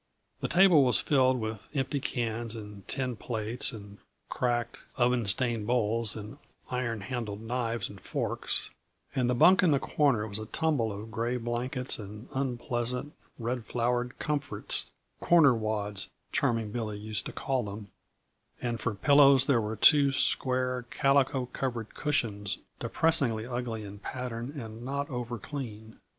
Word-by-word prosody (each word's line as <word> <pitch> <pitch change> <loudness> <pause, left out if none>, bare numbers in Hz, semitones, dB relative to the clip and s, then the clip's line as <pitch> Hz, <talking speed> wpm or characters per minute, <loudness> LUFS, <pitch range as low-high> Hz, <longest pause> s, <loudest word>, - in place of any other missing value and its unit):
The - - -1
table 175 -3 +6
was 125 -7 +4
filled 130 -1 +3
with 110 -1 -5
empty 135 +1 0
cans 115 -4 -3
and 105 -3 -9
tin 130 -3 -2
plates 115 +2 -2
and 105 -3 -10 0.3
cracked, 120 -1 -1 0.2
oven 120 -2 +2
stained 115 +1 0
bowls 115 -2 +2
and 110 +6 -8 0.3
iron 120 -4 -2
handled 110 -2 -4
knives 115 -2 -2
and 100 -2 -12
forks, - - -2 0.4
and 125 -2 +2
the 125 - +2
bunk 180 +9 +6
in 180 - +4
the 140 -2 +4
corner 135 -9 +2
was 100 0 -4
a 110 - -6
tumble 145 -6 0
of 105 +3 -7
gray 115 +3 -1
blankets 125 +2 -2
and 105 +3 -9
unpleasant, 125 0 -1 0.2
red 120 0 -2
flowered 125 +2 -1
comforts 145 -2 -2 0.3
corner 160 -6 +6
wads, 105 -3 -2 0.2
Charming 115 -3 0
Billy 110 -2 -3
was 105 - -9
used 105 -2 -2
to - - -6
calling 130 -4 -1
them 100 0 -8 0.7
and 120 -2 -2
for 110 -1 -2
pillows 140 +2 +6
there 130 -5 +3
were 110 +1 -3
two 140 +5 +7
square, 130 -1 +1
calico 135 -2 +2
covered 120 -3 -4
cushions, 105 -9 -1 0.2
depressingly 120 -9 +1
ugly 120 -3 -3
in 100 0 -9
pattern 125 +4 -5
and 110 -2 -8
not 140 +3 -3
over 120 -1 -3
clean. 110 -3 -7
120 Hz, 150 wpm, -29 LUFS, 110-130 Hz, 0.7 s, two